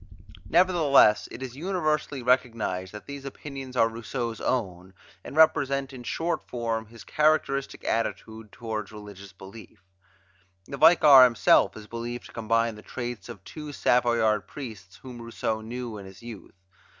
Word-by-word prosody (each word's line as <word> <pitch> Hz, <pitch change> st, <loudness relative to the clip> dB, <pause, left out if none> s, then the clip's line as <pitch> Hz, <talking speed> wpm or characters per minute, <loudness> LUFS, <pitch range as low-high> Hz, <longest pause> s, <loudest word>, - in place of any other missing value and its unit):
Nevertheless, 160 Hz, -10 st, +4 dB
it 125 Hz, -, -8 dB
is 125 Hz, -1 st, -7 dB
universally 155 Hz, -5 st, -2 dB
recognized 115 Hz, -7 st, 0 dB
that 105 Hz, -, -10 dB
these 140 Hz, -1 st, -8 dB
opinions 135 Hz, -2 st, -8 dB
are 115 Hz, -, +5 dB
Rousseau's 115 Hz, 0 st, -5 dB
own, 95 Hz, -6 st, -3 dB, 0.3 s
and -, -, -9 dB
represent 140 Hz, -4 st, +3 dB
in 130 Hz, -, -9 dB
short 165 Hz, +7 st, -2 dB
form 115 Hz, -2 st, -4 dB
his 115 Hz, +1 st, -13 dB
characteristic 150 Hz, -3 st, 0 dB
attitude 110 Hz, -1 st, -3 dB
toward 110 Hz, -3 st, -5 dB
religious 100 Hz, -2 st, -11 dB
belief. 100 Hz, 0 st, -14 dB, 0.8 s
The 140 Hz, -, -7 dB
Vicar 145 Hz, -4 st, +8 dB
himself 120 Hz, -3 st, +4 dB
is 110 Hz, -, -10 dB
believed 120 Hz, +2 st, -6 dB
to -, -, -13 dB
combine 115 Hz, 0 st, 0 dB
the 105 Hz, -, -12 dB
traits 120 Hz, 0 st, -6 dB
of 105 Hz, -5 st, -10 dB
two 150 Hz, +4 st, -8 dB
Savoyard 120 Hz, -6 st, +2 dB
priests 110 Hz, -9 st, -9 dB
whom 125 Hz, -2 st, -10 dB
Rousseau 115 Hz, -1 st, -3 dB
knew 115 Hz, -1 st, -6 dB
in 95 Hz, -, -10 dB
his 95 Hz, +3 st, -14 dB
youth. 115 Hz, -6 st, -10 dB
120 Hz, 145 wpm, -26 LUFS, 110-135 Hz, 0.8 s, Vicar